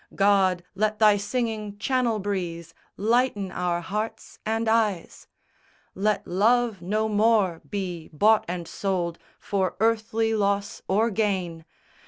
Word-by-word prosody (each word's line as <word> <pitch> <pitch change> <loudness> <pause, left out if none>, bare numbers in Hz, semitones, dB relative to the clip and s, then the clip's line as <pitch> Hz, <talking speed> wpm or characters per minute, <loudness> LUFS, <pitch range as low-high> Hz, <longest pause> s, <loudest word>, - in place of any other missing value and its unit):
God, 195 -3 +3
let 215 +2 0
Thy 210 -1 +6
singing 215 -1 -3
Channel 245 0 +1
breeze 175 -5 -4 0.2
Lighten 215 -3 +1
our 175 -1 -1
hearts 210 +5 -5
and 225 +1 0
eyes! 215 -6 0 0.7
Let 210 +2 0
love 220 +2 +2
no 215 +5 0
more 210 -5 +2
be 180 -5 -4
bought 210 +7 +4
and 175 -1 -4
sold 175 -4 -2 0.2
For 190 -2 -1
earthly 225 0 +1
loss 200 -1 0
or 220 +4 +2
gain. 185 -6 -1
205 Hz, 120 wpm, -25 LUFS, 185-220 Hz, 0.7 s, Thy